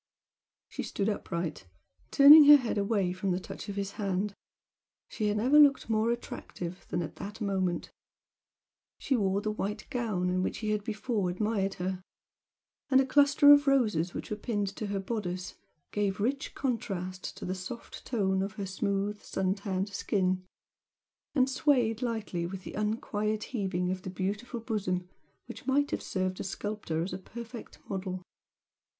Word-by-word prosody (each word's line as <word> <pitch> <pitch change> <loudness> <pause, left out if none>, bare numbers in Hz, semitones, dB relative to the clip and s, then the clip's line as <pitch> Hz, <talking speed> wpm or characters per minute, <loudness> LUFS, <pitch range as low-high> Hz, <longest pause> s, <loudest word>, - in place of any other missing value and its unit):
She - - -5
stood 200 - -2
upright, 170 - -3 0.4
turning 290 +2 +10
her 295 +1 +11
head 240 -5 -2
away 200 -3 +1
from 185 +1 -2
the 180 0 +1
touch 190 - -8
of 200 - -4
his 200 0 -2
hand. 200 -1 -2 0.8
She 215 - -2
had 210 0 +1
never 260 +8 +5
looked 275 -5 +5
more 220 +1 +2
attractive 185 -6 -5
than 175 - -1
at 155 - -8
that 205 +2 -7
moment, 190 -4 -1 1.1
she 275 - 0
wore 200 -3 +1
the 215 - -1
white 210 0 -3
gown 220 -8 -1
in 185 0 +1
which - - -2
he 215 -1 -2
had 210 -1 0
before 210 -2 -1
admired 195 +1 -1
her, 185 +1 -3 0.9
and 265 -1 +6
a 265 - +4
cluster 285 +1 +7
of 285 0 +4
roses 210 -11 +2
which - - -6
were 210 - -1
pinned 205 -2 -1
to 215 - -3
her 200 -1 -2
bodice 185 -3 -4 0.4
gave 200 -2 -1
rich 265 +6 -1
contrast 195 -8 -3
to - - -6
the 185 - -2
soft 190 +6 -8
tone 190 -5 0
of 195 +1 -3
her 205 -2 -4
smooth, 200 +2 -2
suntanned 190 0 -1
skin, 185 -2 0 0.9
and 260 -2 +4
swayed 255 -4 +2
lightly 215 -8 -2
with 190 +1 -7
the - - -8
unquiet 215 0 -1
heaving 185 -5 -1
of 185 0 -3
the 185 - -6
beautiful 200 +6 -3
bosom 190 -6 -2 0.4
which - - -10
might 285 +2 +2
have - - -1
served 185 -1 -2
a - - -2
sculptor 195 -4 -3
as 180 - -5
a 185 - -4
perfect 235 +4 -9
model. 185 -2 -4
205 Hz, 165 wpm, -30 LUFS, 185-230 Hz, 1.1 s, her